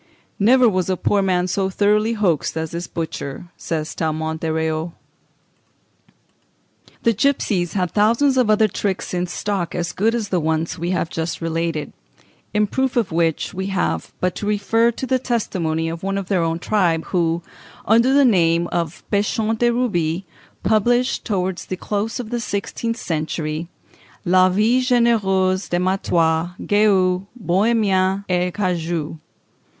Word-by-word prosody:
"Never 245 +4 +5
was 185 -4 0
a 185 - 0
poor 200 +3 +1
man 180 -2 +1
so 190 +1 -1
thoroughly 210 +3 +2
hoaxed 180 -8 0
as 160 -1 -3
this 170 +1 -4
butcher," 160 0 -5
says 155 -1 -4
Tallemant 160 0 -2
des 160 - -1
Réaux. 160 +1 -1 2.1
The 230 - +3
gipsies 210 -7 0
had 180 -3 -1
thousands 235 +6 +3
of 250 -4 +2
other 215 0 +4
tricks 195 -1 -3
in 180 0 -1
stock 190 -1 -3
as 175 -1 -2
good 225 +4 +1
as 220 -4 -3
the 185 - +1
ones 160 0 -1
we 170 +1 -2
have 180 -2 -1
just 165 0 -3
related, 165 -2 -2 0.6
in 210 -1 +2
proof 265 +4 -1
of 225 -7 +1
which 165 +1 0
we 190 0 -3
have 80 - -1
but 180 -1 0
to 205 - -4
refer 220 +3 +2
to 235 +3 -4
the 260 0 +1
testimony 175 -10 -1
of 165 +1 -5
one 195 +1 -2
of 195 -2 -5
their 190 -4 +2
own 165 0 0
tribe, 170 -3 +1
who, 170 -1 +1 0.4
under 235 +4 +4
the 280 0 +5
name 170 -6 +3
of 170 -1 -3
Pechon 215 +2 +1
de 240 - +3
Ruby, 190 -8 0 0.4
published, 240 +4 +2
towards 185 -3 -2
the 185 - -4
close 210 +5 -3
of 235 -2 -6
the 240 - -1
sixteenth 230 +2 -3
century, 155 -2 -3 0.6
"La 185 +1 +5
Vie 215 +7 +2
Généreuse 205 -7 +2
des 175 - +1
Mattois, 175 -2 +1
Guex, 190 -3 +2 0.2
Bohémiens, 195 -1 +1
et 180 0 +1
Cagoux." 170 -5 -2
185 Hz, 155 wpm, -21 LUFS, 170-215 Hz, 2.1 s, Never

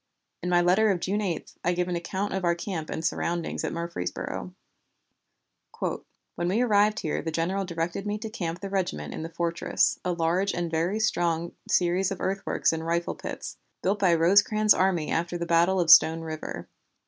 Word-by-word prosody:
In 180 - -2
my 175 -1 +4
letter 190 +5 +4
of 190 -3 +1
June 200 +4 -1
8, 180 -6 -3
I 175 - +2
give 180 0 -1
an 180 - -2
account 190 +4 -3
of 190 -1 -2
our 170 -1 +2
camp 170 -3 -5
and 160 - -4
surroundings 170 0 -2
at - - -2
Murfreesboro: 170 - -4 1.3
"When 175 - -5
we 200 +7 +1
arrived 210 -2 +3
here 155 - -2
the 165 - -3
general 175 +5 -1
directed 170 +3 -3
me 205 0 -1
to 220 +1 -6
camp 175 -6 -4
the 200 - -5
regiment 175 - -2
in - - -5
the 165 - -5
fortress, 170 0 0
a 180 - 0
large 175 +3 0
and 175 -1 -2
very 170 +6 0
strong 170 -5 0 0.2
series 180 +2 +2
of 195 -3 -5
earthworks 195 -3 0
and 160 0 -3
rifle 170 +1 -1
pits, - - -7 0.3
built 200 +2 +1
by 180 -4 +4
Rosecrans's 205 +5 +5
army 180 -4 +1
after 170 +1 -1
the 170 - -3
battle 170 +3 +3
of 170 -2 +4
Stone 160 +1 +7
River. 160 -1 -6
175 Hz, 185 wpm, -27 LUFS, 165-195 Hz, 1.3 s, Stone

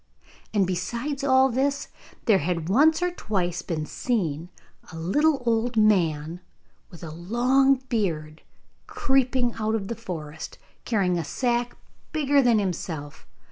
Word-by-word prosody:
And 205 -3 +2
besides 235 +11 -3
all 265 -1 +5
this 275 +3 -1 0.4
there 215 -5 +5
had 165 +1 -2
once 310 - +4
or 360 - +1
twice 180 - -2
been 160 -3 -3
seen 170 - -2 0.4
a 165 - -8
little 275 - +1
old 230 +1 +1
man 170 -6 +2 0.5
with 170 -1 -13
a 160 - -6
long 245 - +3
beard 160 -10 -2 0.5
creeping 260 -2 +1
out 220 0 0
of 195 -3 -3
the 235 - -2
forest, 160 -8 -7 0.3
carrying 185 -6 +1
a - - -2
sack 240 +2 -1 0.4
bigger 285 -2 +3
than 240 -3 +4
himself. 165 -7 -4
215 Hz, 135 wpm, -25 LUFS, 170-260 Hz, 0.5 s, all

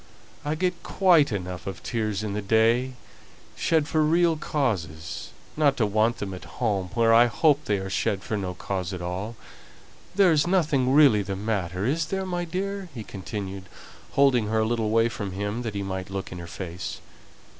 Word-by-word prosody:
I 150 +1 -1
get 180 +1 -1
quite 170 -8 +4
enough 90 -3 -4
of 95 -3 -6
tears 110 -3 -2
in 105 -2 -3
the 105 - -2
day, 115 +5 +2 0.6
shed 160 -3 +1
for 155 - +1
real 165 +2 +3
causes, 95 - -3 0.3
not 145 -3 +3
to 115 - +3
want 110 +3 +2
them 100 -2 -4
at 90 - -8
home, 100 -6 0
where, 115 -1 +4
I 120 +1 +7
hope, 150 +4 +2
they 105 - +1
are 95 0 -4
shed 95 +1 -1
for 110 - -3
no 95 -3 -3
cause 95 0 -3
at 90 - -5
all. 95 +6 -4 0.8
There's 175 -6 +4
nothing 155 -8 +2
really 135 -7 +6
the 100 0 -4
matter, 95 -2 -2
is 150 +5 0
there, 190 +2 -2
my 175 -1 -2
dear?" 195 +2 -4
he 115 - -5
continued, 95 -1 -6 0.5
holding 130 -6 +4
her 110 +1 +1
a - - +2
little 115 0 0
away 115 +2 +3
from 100 -4 -5
him 105 +4 -3
that 115 -4 -4
he 100 - -2
might 95 -1 -4
look 95 0 -5
in 90 - -6
her 85 - -8
face. 85 +2 -6
110 Hz, 190 wpm, -26 LUFS, 95-145 Hz, 0.8 s, I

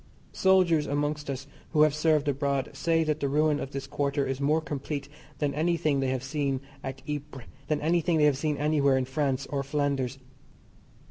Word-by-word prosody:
Soldiers 180 -5 +3
amongst 145 +1 -1
us 135 0 -4 0.3
who 150 - +6
have 155 -2 +4
served 155 -1 +2
abroad 140 -1 0
say 165 -1 +1
that 155 -1 -1
the 140 - 0
ruin 150 +1 +2
of - - -4
this 135 -1 -5
quarter 140 0 -1
is 135 0 -3
more 150 +3 +3
complete 145 -2 -4 0.3
than 145 0 0
any 165 +4 +1
thing 150 -4 +1
they 135 - 0
have 130 -1 -2
seen 135 -1 -1 0.2
at 130 - -6
Ypres, 145 -4 -5 0.2
than 150 0 +1
anything 170 +1 +2
they 150 - +4
have 145 -2 +4
seen 150 +1 -1
anywhere 145 -2 +3
in 130 - 0
France 135 0 -1
or 140 -1 0
Flanders. 140 -2 -1
145 Hz, 190 wpm, -28 LUFS, 135-155 Hz, 0.3 s, who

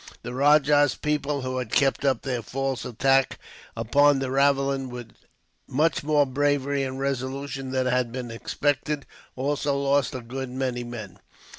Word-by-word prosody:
The 120 - -6
rajah's 145 +1 +4
people, 150 -1 -1
who 130 0 -2
had 120 -4 -5
kept 135 -1 +2
up 135 -2 +1
their 125 -3 -2
false 135 +1 -3
attack 135 +3 +2 0.4
upon 140 +6 +4
the 135 -1 -2
ravelin 135 -1 +2
with 120 -2 -8 0.6
much 150 +3 +1
more 145 -1 +3
bravery 140 +1 0
and 130 0 -3
resolution 135 0 -3
than 130 0 0
had 125 -2 +1
been 125 -1 -5
expected, 145 +4 -1 0.3
also 140 +1 -1
lost 140 -2 +1
a 130 - -4
good 130 +3 -5
many 125 -1 -2
men. 115 -5 -8
135 Hz, 150 wpm, -25 LUFS, 125-140 Hz, 0.6 s, rajah's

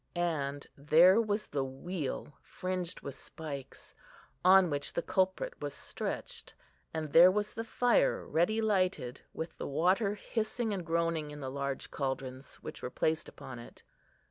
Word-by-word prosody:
And 145 -5 -1
there 170 +9 +6
was 210 -1 -1
the 140 -2 -1
wheel, 145 +2 -4
fringed 185 -2 -4
with 140 - -6
spikes, 140 -1 -7 0.5
on 185 -2 +7
which 145 0 -1
the 170 - -1
culprit 190 - +1
was - - -3
stretched; 475 -2 -4 0.4
and 155 -2 -3
there 175 +4 +9
was 210 +2 -1
the 225 - -3
fire 250 - +2
ready 195 +8 +2
lighted, 185 - 0
with 160 - -5
the - - -3
water 185 +8 +2
hissing 220 +1 -2
and 190 -3 -3
groaning 165 -2 0
in 150 0 -8
the 130 -2 -4
large 140 -1 -3
caldrons 135 -1 -4
which - - -7
were - - -3
placed 155 +5 0
upon 125 -2 -9
it. 120 - -12
170 Hz, 150 wpm, -32 LUFS, 140-195 Hz, 0.5 s, there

